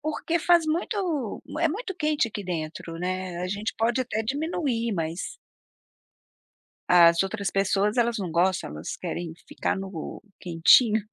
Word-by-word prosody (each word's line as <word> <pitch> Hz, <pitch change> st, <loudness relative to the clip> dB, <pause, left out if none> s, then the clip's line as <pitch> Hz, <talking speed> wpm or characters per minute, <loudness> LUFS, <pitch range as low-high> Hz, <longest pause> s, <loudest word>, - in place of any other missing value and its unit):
porque 310 Hz, +2 st, -1 dB
faz 345 Hz, -1 st, +4 dB
muito 330 Hz, -, -2 dB, 0.2 s
é 335 Hz, -, +3 dB
muito 390 Hz, +4 st, -4 dB
quente 305 Hz, -6 st, +1 dB
aqui 205 Hz, -2 st, -6 dB
dentro, 165 Hz, -1 st, -5 dB
né, 185 Hz, 0 st, -3 dB
a 180 Hz, -, -2 dB
gente 205 Hz, +3 st, -3 dB
pode 235 Hz, +3 st, +1 dB
até 225 Hz, -3 st, -2 dB
diminuir, 270 Hz, -3 st, -1 dB
mas 165 Hz, +1 st, -3 dB, 1.5 s
as 170 Hz, -1 st, +7 dB
outras 200 Hz, 0 st, -3 dB
pessoas, 200 Hz, +3 st, +1 dB
elas 235 Hz, -1 st, +2 dB
não 185 Hz, -5 st, -3 dB
gostam. 175 Hz, -, +1 dB
Elas 75 Hz, +2 st, -6 dB
querem 170 Hz, -2 st, -4 dB
ficar -, -, -2 dB
no 190 Hz, -4 st, -6 dB, 0.2 s
quentinho. 195 Hz, +6 st, +5 dB
210 Hz, 140 wpm, -26 LUFS, 180-290 Hz, 1.5 s, as